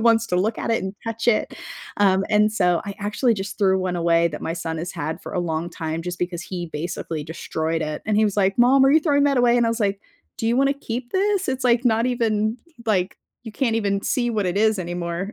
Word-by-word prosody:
wants 230 0 +4
to 180 - -2
look 205 +5 0
at - - -2
it 225 - 0
and 190 0 -4
touch 225 +1 -2
it. 220 - +1 0.4
Um, 195 -1 +3
and 210 0 +4
so 180 -5 +2
I 200 -1 -5
actually 215 +4 +1
just 195 -1 -6
threw 190 -2 +3
one 185 -1 -2
away 170 -1 +3
that 150 - -7
my 165 - -2
son 165 -1 -4
has 170 +3 -4
had 160 -2 -4
for - - -8
a - - -2
long 165 0 -2
time 160 -1 -4
just 175 0 -5
because 175 -1 -3
he 180 -3 -5
basically 160 0 -4
destroyed 160 +1 -3
it, 155 0 -4
and 215 - +1
he 215 - +4
was 205 -1 -1
like, 195 +1 +2
"Mom, 260 +3 +6
are 270 - +5
you 315 - +6
throwing 285 -3 +2
that 280 -2 +2
away?" 245 0 +4
and 235 - +3
I - - +2
was 230 - -1
like, 200 -1 0 0.4
"Do 225 - -3
you 240 - +2
wanna 275 +1 +3
keep 245 -3 -6
this? 390 -3 +1
It's, 265 0 -1
like, 245 0 +3
not 230 0 +3
even, 225 -2 0 0.3
like, 185 -3 0 0.3
you 225 - -8
can't 230 -2 0
even 200 -2 0
see 240 -3 0
what 210 -4 -1
it 180 +2 -1
is 220 -1 +3
anymore," 175 +3 -4
205 Hz, 250 wpm, -22 LUFS, 175-235 Hz, 0.4 s, Mom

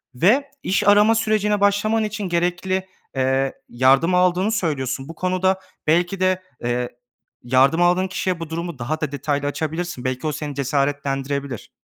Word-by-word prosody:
ve 240 - +3
iş 200 +2 0
arama 210 +2 +6
sürecine 215 -2 +1
başlaman 205 +2 +2
için 210 -2 -3
gerekli, 180 +2 -1 0.3
eee, 135 0 +1 0.2
yardım 135 +8 +3
aldığını 180 +3 +2
söylüyorsun. 140 - -2
Bu 165 - -8
konuda 185 +2 +1 0.3
belki 175 +4 +2
de, 185 0 +2 0.2
eee, 120 +1 -1 0.5
yardım 130 +6 +3
aldığın 180 +2 +3
kişiye 185 -1 -2
bu 165 -2 -6
durumu 170 -2 -5
daha 155 +6 -3
da 150 -3 -2
detaylı 145 0 -2
açabilirsin. 160 0 -3
Belki 130 +3 -2
o - - 0
seni 150 -1 -5
cesaretlendirebilir. 140 -1 -2
170 Hz, 145 wpm, -22 LUFS, 140-190 Hz, 0.5 s, arama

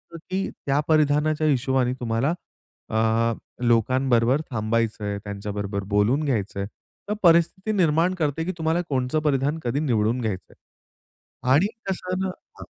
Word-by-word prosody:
असं - - -5
की 190 +1 -1 0.2
त्या 140 +1 +2
परिधानाच्या 155 0 +3
हिशोबाने 130 -2 +2
तुम्हाला, 120 +6 0 0.6
अ, 115 +1 +2 0.3
लोकांबरोबर 125 +2 +3
थांबायचं 110 -1 -1
आहे, 100 0 -2
त्यांच्याबरोबर 100 0 -4
बोलून 115 +9 +3
घ्यायचंय, 100 -7 -1 0.4
तर - - +1
परिस्थिती 170 +4 +4
निर्माण 165 +1 +3
करते, 160 -2 -1
की 185 - -1
तुम्हाला 160 +1 +1
कोणचं 130 +2 0
परिधान 145 +1 +1
कधी 120 +4 0
निवडून 120 -4 +1
घ्यायचं 105 -5 -4
आहे - - -33 0.9
आणि 160 +9 +4 0.2
तसं 185 -1 -2
न 190 0 -1 0.3
हं. - - -7
130 Hz, 135 wpm, -24 LUFS, 115-155 Hz, 0.9 s, परिस्थिती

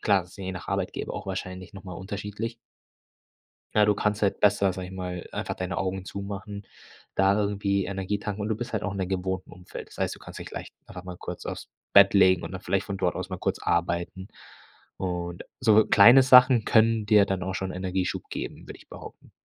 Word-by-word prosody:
Klar, 100 -3 +3
ist 90 - -16
je 95 -1 -4
nach 90 - -8
Arbeitgeber - - -3
auch - - -6
wahrscheinlich 95 +2 -6
noch 95 - -10
mal 90 - -8
unterschiedlich. 105 +4 -5 1.2
Ja, 105 -1 +5
du 105 - +3
kannst 105 +1 -1
halt 100 - +1
besser, 100 -2 +3
sage 90 0 -6
ich 95 - -10
mal, 90 -2 -5
einfach - - -3
deine 90 -1 -4
Augen 95 +1 -2
zumachen, 100 +1 -7 0.5
da 95 +1 +4
irgendwie 100 -1 0
Energie 100 +1 -2
tanken 105 0 -4
und 105 - -2
du 110 - +1
bist 120 +1 -6
halt 110 - -1
auch 105 - -2
in 100 - -5
deinem 95 - -2
gewohnten 95 0 -3
Umfeld. 90 -1 -10
Das - - -16
heißt, - - -1
du - - -15
kannst - - -10
dich - - -8
leich - - -7
einfach 90 -1 -10
mal 90 -1 -7
kurz - - -7
aufs - - -6 0.2
Bett 100 0 +7
legen 95 -3 +5
und - - -7
dann 95 - -6
vielleicht 100 -1 -1
von 100 - -4
dort 90 -2 0
aus 90 0 -5
mal 95 -2 -5
kurz - - -1
arbeiten. 85 +2 -1 0.7
Und 85 -2 -4 0.2
so 110 -3 +5
kleine 120 +6 +8
Sachen 125 -2 +7
können 110 -1 +3
dir 105 -1 +5
dann 95 -2 -2
auch 95 +1 -3
schon 95 0 -3
Energieschub 95 0 -2
geben, - - -6
würde - - -9
ich - - -20
behaupten. - - -12
95 Hz, 215 wpm, -26 LUFS, 95-105 Hz, 1.2 s, kleine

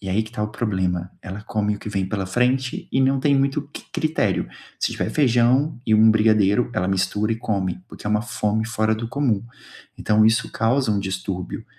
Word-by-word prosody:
e 95 - -7
aí 105 +4 +1
que 110 - -10
tá 110 - -5
o 105 - +1
problema. 95 -5 -2
Ela 95 +3 -7
come 105 -1 -1
o - - -12
que - - -6
vem 100 -2 -1
pela 100 -2 -2
frente 125 +5 0
e 135 - +2
não 135 +1 +3
tem 140 0 +3
muito 140 +1 0
c - - -8
critério. 155 - 0 0.3
Se - - 0
tiver - - -2
feijão 130 +1 +2
e 110 - +1
um 110 +1 +6
brigadeiro 110 +1 +3
ela 90 - 0
mistura 95 +3 0
e - - -2
come, 95 -5 -2
porque - - -10
é 105 - 0
uma 105 +1 +2
fome 110 -2 -1
fora 110 -1 +1
do 115 +1 -5
comum. 120 -7 0 0.5
Então 110 0 +3
isso 110 0 +2
causa 120 +2 +1
um 100 - 0
distúrbio. 95 -1 -4
110 Hz, 210 wpm, -22 LUFS, 100-125 Hz, 0.5 s, um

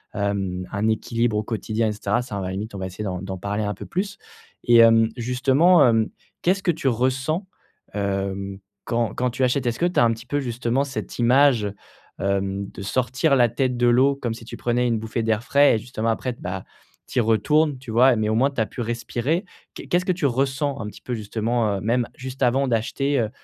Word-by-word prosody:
hem, 95 -3 -2
un 105 +1 0
équilibre 115 0 0
au 105 - 0
quotidien 110 0 -1
et - - -1
cetera? 105 +3 -1
Ça, 100 -5 -5
à - - -3
la 90 - -3
limite 105 +4 -5
on 100 - -6
va 95 - -3
essayer 95 +3 -7
d'en 90 -3 -3
d'en 95 0 -5
parler 100 +3 -3
un 105 -1 -2
peu - - -9
plus 195 +2 -3 0.5
et 120 -1 +5
hem, 115 -1 +6
justement, 135 +7 +4
hem, 115 -2 +2 0.3
qu'est-ce 190 +2 +1
que 175 - +3
tu 160 -4 -3
ressens, 130 - 0 0.5
hem, 100 -1 -2 0.3
quand 115 -2 0
quand 125 0 0
tu 125 +2 -2
achètes? 130 +1 +1
Est-ce 120 0 -1
que 175 - +2
tu 180 - +1
as - - +6
un 115 - +4
petit 115 +1 -10
peu 145 +3 -1
justement 120 0 -1
cette 140 -2 -6
image, 120 -3 +4 0.5
hem, 100 0 -1
de - - -10
sortir 130 +7 +1
la 120 -3 +4
tête 125 +2 0
de 120 0 +3
l'eau 130 +4 +4
comme 120 -4 -3
si 115 0 -11
tu - - -8
prenais 120 +1 0
une 115 -2 0
bouffée 110 +1 -3
d'air 110 0 0
frais, 140 0 +4
et - - +1
justement 115 0 -3
après 125 +3 -1
t - - -20
bah 90 +1 -4 0.4
tu - - -7
y - - +5
retournes, 140 +7 +2
tu 125 -3 -8
vois 125 +4 +5
et - - 0
mais 110 0 0
au 110 - +1
moins 130 +5 +3
tu 135 - -2
as - - +2
pu 120 - -7
respirer. 120 - -2 0.3
Qué - - -9
qu'est-ce 180 +1 +1
que 185 - +2
tu 170 -4 -2
ressens 135 +2 0
un 105 - -4
petit 105 - -11
peu, 125 - -5
justement, 110 0 -1
heu, 95 - -6
même 120 +3 +1
juste 130 +1 -5
avant 130 +3 +2
d'acheter, 130 +4 0
heu, 110 -3 0
120 Hz, 235 wpm, -23 LUFS, 105-130 Hz, 0.5 s, hem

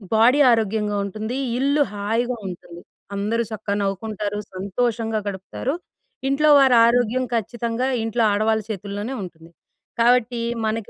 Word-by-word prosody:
Body 240 +6 +5
ఆరోగ్యంగా 215 -2 0
ఉంటుంది, 215 +5 -4 0.2
ఇల్లు 280 +2 +2
హాయిగా 230 +4 -1
ఉంటుంది. 175 -1 -9 0.3
అందరూ 220 +4 0
చక్కగా 210 -2 -3
నవ్వుకుంటారు, 205 +1 -3 0.2
సంతోషంగా 225 +3 -1
గడుపుతారు. 200 +7 -4 0.5
ఇంట్లో 300 +3 +3
వారారోగ్యం 245 -1 +4
ఖచ్చితంగా 235 +2 -2 0.2
ఇంట్లో 225 +1 0
ఆడవాళ్ళు 220 +1 +1
చేతుల్లోనే 205 +3 -4
ఉంటుంది. 170 -3 -10 0.5
కాబట్టి, 240 0 +3 0.2
మనకి 220 -1 -2
220 Hz, 110 wpm, -22 LUFS, 205-240 Hz, 0.5 s, Body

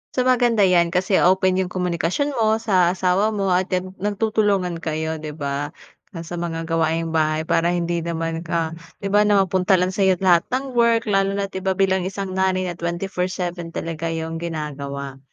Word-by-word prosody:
So, 255 - +2
maganda 240 -4 +3
yan 175 -2 +4
kasi 185 +2 +2
open 185 +1 +3
yung 180 -1 -2
komunikasyon 180 - -1
mo 220 0 +3
sa 185 -4 +3
asawa 185 +3 +2
mo 195 -2 0
at, 180 +1 +2
yan, 185 +1 -3
nagtutulungan 205 -4 0
kayo, 160 0 -3
'di 150 -1 -7
ba, 145 +1 -4 0.4
na 165 - -5
sa 170 +1 -6
mga 165 -1 -3
gawaing 165 0 0
bahay 155 0 +1
para 165 +1 +1
hindi 170 0 -1
naman 165 -1 -3
ka 165 -1 -2 0.3
'di 195 - -2
ba, 210 0 +4
na 200 -2 +4
mapunta 185 +1 +2
lang 180 +1 +1
sa'yo 190 -1 +3
lahat 175 -2 +4
ng 265 +1 -2
work 235 -1 +3
lalo 195 0 +2
na't 200 0 -2
'di 190 - -4
ba, 190 0 -1
bilang 190 -1 +1
isang 195 0 -5
nanay 190 0 +1
na 175 -1 -5
24/7 175 -1 -3
talaga 165 0 -3
yung 165 0 -3
ginagawa. 140 -4 -5
180 Hz, 185 wpm, -22 LUFS, 165-195 Hz, 0.4 s, yan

